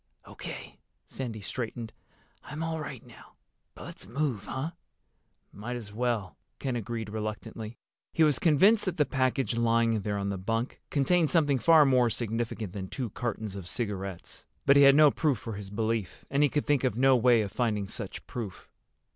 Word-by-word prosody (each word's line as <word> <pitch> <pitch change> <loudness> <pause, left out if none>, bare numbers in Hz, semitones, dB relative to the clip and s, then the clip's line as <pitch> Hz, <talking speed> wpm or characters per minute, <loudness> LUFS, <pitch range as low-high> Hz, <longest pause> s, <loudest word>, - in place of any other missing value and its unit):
"O.K." - - -9 0.3
Sandy 115 -5 -6
straightened. 115 +1 -5 0.5
"I'm 150 +3 -5
all 165 0 -2
right 140 -6 -7
now. - - -16 0.4
But - - -10
let's - - -8
move, 125 -3 -2
huh?" 140 +5 -3 0.8
"Might 120 +5 -5
as 105 -4 -8
well," 110 - -1 0.2
Ken 130 -3 -2
agreed 115 -1 -4
reluctantly. 110 +1 -5 0.3
He 165 - +3
was 150 -2 +3
convinced 190 +7 +5
that 185 -3 -2
the 150 - +4
package 130 -2 0
lying 115 0 +3
in 110 - 0
there 105 0 -2
on 100 0 -2
the 100 -2 -3
bunk 115 +6 -2
contained 155 +3 +2
something 145 -6 +3
far 160 +2 +6
more 125 -3 +4
significant 115 -3 -3
than 95 -2 -5
two 120 +1 -4
cartons 110 -4 -4
of 95 -3 -6
cigarettes. 100 -5 -5 0.2
But 140 - +6
he 140 - +7
had 140 0 +8
no 150 -1 +7
proof 145 -4 +1
for 115 +1 -6
his 100 -1 -7
belief, 110 -1 -2
and 140 +1 +2
he 145 - +5
could 150 - -1
think 145 -2 +2
of 125 -6 +1
no 135 +1 +5
way 120 -1 +5
of 100 - -5
finding 105 -5 0
such - - -7
proof. 110 -7 -7
120 Hz, 180 wpm, -29 LUFS, 105-140 Hz, 0.8 s, had